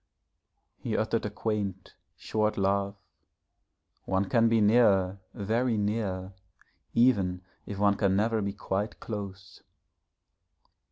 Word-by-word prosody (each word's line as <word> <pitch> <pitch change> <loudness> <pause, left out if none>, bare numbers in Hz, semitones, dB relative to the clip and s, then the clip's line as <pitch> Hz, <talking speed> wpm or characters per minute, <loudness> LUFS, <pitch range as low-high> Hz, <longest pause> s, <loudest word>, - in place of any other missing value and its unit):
He - - -2
uttered - - 0
a - - -4
quaint, 100 -4 -3 0.2
short 110 0 -1
laugh. 100 0 +1 1.1
'One 95 +1 0
can 115 -1 +4
be 115 0 +3
near 100 -4 +4 0.2
very 115 +3 0
near, 100 -3 -2 0.6
even 100 -7 +3 0.2
if 100 - -5
one 100 0 +3
can 95 -3 +2
never 110 +2 +1
be 100 0 -2
quite 100 +1 -3
close.' 100 -3 -7
100 Hz, 110 wpm, -28 LUFS, 95-110 Hz, 1.1 s, can